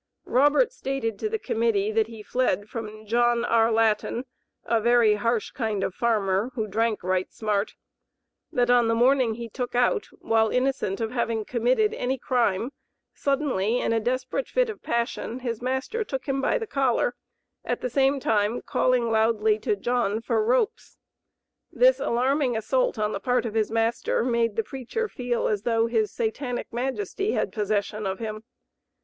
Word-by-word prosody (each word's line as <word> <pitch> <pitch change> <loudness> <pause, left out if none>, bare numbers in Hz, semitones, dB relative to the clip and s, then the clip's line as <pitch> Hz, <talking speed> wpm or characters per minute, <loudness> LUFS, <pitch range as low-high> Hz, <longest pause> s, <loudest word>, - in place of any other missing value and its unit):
Robert 290 - +3
stated 270 - -3
to 435 - -1
the 445 - -1
Committee 225 - 0
that 220 0 +2
he 225 -2 -10
fled 210 -4 0
from 215 -2 -7
"John 240 +2 +2
R. 230 -1 +3
Laten, 225 +2 +1 0.4
a 230 -1 +1
very 235 -1 +4
harsh 225 +2 -1
kind 220 -6 -2
of 190 - -2
a - - -31
farmer, 210 -2 +1
who 220 -4 -1
drank 220 +1 -1
right 185 0 -1
smart," 210 -1 -1 0.8
that 245 -5 +2
on 240 -2 +4
the 230 - +2
morning 245 -1 +3
he 235 0 -6
"took 245 +2 -5
out," 245 - +2
while 220 -1 +2
innocent 250 -5 0
of 225 -1 -2
having 230 -3 -1
committed 255 - +1
any 265 - -1
crime, 240 -2 0 0.4
suddenly 260 -6 0
in - - 0
a 225 - +2
desperate 255 - -2
fit - - +1
of 425 - -12
passion, 235 +1 -2
his 235 -3 -3
master 265 - -2
took 270 -10 -5
him 275 -1 -1
"by 270 - +2
the 455 - -4
collar," 265 - +1 0.5
at - - -2
the - - -1
same 275 +1 +2
time 215 -1 +1
calling 245 -2 +1
loudly 220 -1 +2
to 210 - 0
"John" 225 0 0
for 225 -1 0
"ropes." 260 - 0 0.7
This - - +4
alarming 255 +1 +1
assault - - 0
on 210 0 0
the 200 - -3
part 245 +3 0
of 220 - -3
his 220 -2 +1
master 225 +1 0
made 235 -3 +1
the 225 - 0
preacher 270 - -4
feel 245 - -2
as 210 -2 0
though 225 0 +1
his 225 -3 0
Satanic 245 +2 -3
majesty 255 - -2
had - - -1
possession 210 0 -1
of 190 0 -2
him. 215 -1 -5
235 Hz, 170 wpm, -25 LUFS, 220-255 Hz, 0.8 s, very